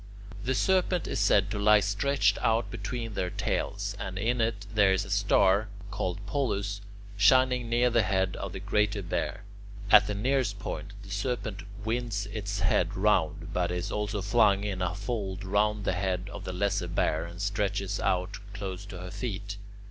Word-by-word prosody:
The 130 Hz, +2 st, 0 dB
Serpent 185 Hz, +1 st, +2 dB
is -, -, -2 dB
said 100 Hz, 0 st, +3 dB
to 105 Hz, -, -2 dB
lie 105 Hz, +1 st, +6 dB
stretched 105 Hz, +8 st, +1 dB
out 115 Hz, +1 st, +1 dB
between 115 Hz, +2 st, -4 dB
their 90 Hz, -2 st, -1 dB
tails, -, -, -2 dB
and 95 Hz, 0 st, -5 dB
in 115 Hz, +4 st, +1 dB
it 110 Hz, -3 st, -1 dB
there 100 Hz, -3 st, +5 dB
is 95 Hz, -, 0 dB
a -, -, -8 dB
star, 100 Hz, 0 st, +3 dB, 0.2 s
called 95 Hz, +1 st, -3 dB
Polus, 100 Hz, -4 st, -1 dB, 0.4 s
shining 125 Hz, +3 st, +4 dB
near 120 Hz, +1 st, +3 dB
the 115 Hz, -, +4 dB
head 95 Hz, -2 st, 0 dB
of 100 Hz, -, -5 dB
the 95 Hz, -, -5 dB
Greater 100 Hz, +1 st, 0 dB
Bear. 90 Hz, +2 st, -3 dB, 0.5 s
At 105 Hz, -1 st, +8 dB
the 105 Hz, -, -2 dB
nearest 120 Hz, -1 st, 0 dB
point, 100 Hz, 0 st, -6 dB
the 95 Hz, -, -11 dB
Serpent 105 Hz, -1 st, -2 dB, 0.2 s
winds 115 Hz, -3 st, -1 dB
its 100 Hz, -2 st, -3 dB
head 90 Hz, -, +1 dB
round, -, -, +1 dB
but 90 Hz, -1 st, 0 dB
is 90 Hz, +2 st, -3 dB
also 105 Hz, -1 st, -2 dB
flung 100 Hz, -1 st, +4 dB
in 100 Hz, -3 st, -3 dB
a 90 Hz, 0 st, -1 dB
fold 100 Hz, -2 st, -3 dB
round 105 Hz, +1 st, +1 dB
the -, -, +1 dB
head 95 Hz, +1 st, -2 dB
of 100 Hz, -1 st, -7 dB
the 95 Hz, -, -3 dB
Lesser 95 Hz, 0 st, 0 dB
Bear, 85 Hz, -1 st, 0 dB
and 85 Hz, +1 st, -10 dB
stretches 100 Hz, -1 st, -1 dB
out 90 Hz, +2 st, 0 dB, 0.2 s
close 100 Hz, -1 st, -5 dB
to 95 Hz, -, -8 dB
her 90 Hz, 0 st, -7 dB
feet. 105 Hz, -4 st, -4 dB
100 Hz, 180 wpm, -29 LUFS, 95-110 Hz, 0.5 s, At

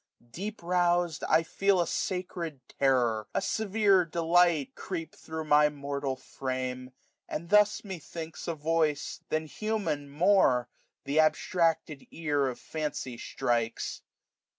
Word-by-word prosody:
Deq^ 205 Hz, -, -5 dB
rous'd^ 175 Hz, -2 st, +1 dB
I 160 Hz, +1 st, +5 dB
£cel 195 Hz, +3 st, +2 dB
540 175 Hz, -, +3 dB
A -, -, -5 dB
sacred 175 Hz, -7 st, -3 dB, 0.2 s
terror, 120 Hz, -6 st, +2 dB
a -, -, +3 dB
severe 205 Hz, -3 st, +2 dB
delight^ 170 Hz, -2 st, +2 dB
Creep 165 Hz, -4 st, -5 dB
thro* 160 Hz, 0 st, -6 dB
my 150 Hz, 0 st, +5 dB
mortal 140 Hz, -2 st, -3 dB
frame 130 Hz, -1 st, -4 dB, 0.4 s
i -, -, -4 dB
and 170 Hz, +4 st, -5 dB
thus, 210 Hz, 0 st, +5 dB
methinks^ 165 Hz, -4 st, -7 dB
A 170 Hz, -, -1 dB
voice, 155 Hz, -1 st, 0 dB
than 155 Hz, 0 st, 0 dB
human 200 Hz, -6 st, -2 dB
more, 145 Hz, -6 st, +3 dB, 0.4 s
th' 140 Hz, +3 st, +1 dB
abstracted 155 Hz, -1 st, +1 dB
ear 145 Hz, -4 st, 0 dB
Of 125 Hz, -, -4 dB
fancy 150 Hz, -5 st, -4 dB
strikes. 115 Hz, 0 st, -2 dB
160 Hz, 130 wpm, -29 LUFS, 140-175 Hz, 0.4 s, I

